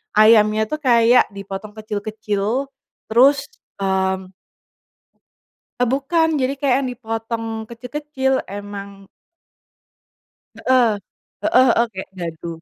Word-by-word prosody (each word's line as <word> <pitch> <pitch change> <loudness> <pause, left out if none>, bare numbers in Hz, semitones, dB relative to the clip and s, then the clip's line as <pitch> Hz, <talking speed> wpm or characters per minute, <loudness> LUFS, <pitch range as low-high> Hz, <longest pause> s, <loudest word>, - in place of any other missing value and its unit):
ayamnya 215 0 +5
tuh 305 - -2
kayak 240 -3 +5
dipotong 200 +1 -7
kecil-kecil, 215 +3 -3 0.4
terus, 275 +4 +5 0.4
mmm. 190 -1 0 1.5
Eee, 250 -1 +2
bukan 310 +4 +1
jadi 260 0 0
kayak 275 -2 +1
yang - - -2
dipotong 225 -1 -4 0.2
kecil-kecil 265 +3 -2
emang. 200 -1 -8 1.5
Heeh, 255 -3 +3 0.5
heeh 255 - +4
heeh, 235 - +3
kayak 190 - -7
dadu, 170 -1 -6
225 Hz, 95 wpm, -20 LUFS, 205-260 Hz, 1.5 s, ayamnya